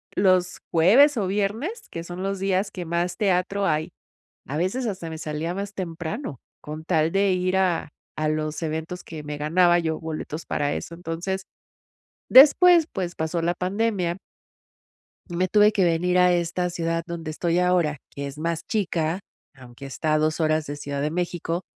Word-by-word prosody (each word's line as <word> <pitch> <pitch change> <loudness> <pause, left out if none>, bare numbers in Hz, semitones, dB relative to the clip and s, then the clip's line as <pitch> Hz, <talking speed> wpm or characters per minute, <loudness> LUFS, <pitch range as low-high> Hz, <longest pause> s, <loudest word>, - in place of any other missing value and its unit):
los 185 -2 +2
jueves 240 - +6
o 200 -4 0
viernes, 220 - -2
que 165 - -5
son 175 +2 -6
los 195 0 -2
días 195 +1 0
que 180 -2 -6
más 175 +2 -1
teatro 195 0 +1
hay, 155 -2 0 0.6
a 145 - -3
veces 195 +10 -1
hasta 185 -5 -4
me 160 - -6
salía 155 +2 -3
más 200 +2 -5
temprano 175 - -5 0.2
con 155 +1 -7
tal 160 -1 +1
de 195 +1 +2
ir 185 +1 +1
a 180 -4 +1 0.3
a 155 0 +1
los 155 +1 -2
eventos 160 +3 -4
que 160 -2 -8
me 150 0 -5
ganaba 175 +4 +4
yo 160 -2 -1
boletos, 160 0 -5
para 145 0 0
eso, 170 - -5
entonces. 175 +3 -4 0.9
Después, 325 +5 +8
pues 180 -3 -3
pasó 160 +1 -2
la 170 +1 +2
pandemia 185 -1 -1 1.1
y 175 - -6
me 185 +1 +1
tuve 210 +3 +5
que 205 -3 +2
venir 175 +1 +2
a 180 0 +5
esta 175 +1 0
ciudad 165 -1 -2
donde 165 -2 -5
estoy 170 +2 0
ahora, 180 -4 +2
que 140 0 -6
es 140 +1 -9
más 165 +1 -2
chica, 175 -4 -1 0.3
aunque 130 0 -12
está 155 +3 -2
a - - +4
2 155 +1 0
horas 155 -1 +1
de 145 - -4
Ciudad 140 -1 -4
de 150 +1 -1
México, 175 0 -2
175 Hz, 175 wpm, -24 LUFS, 160-190 Hz, 1.1 s, Después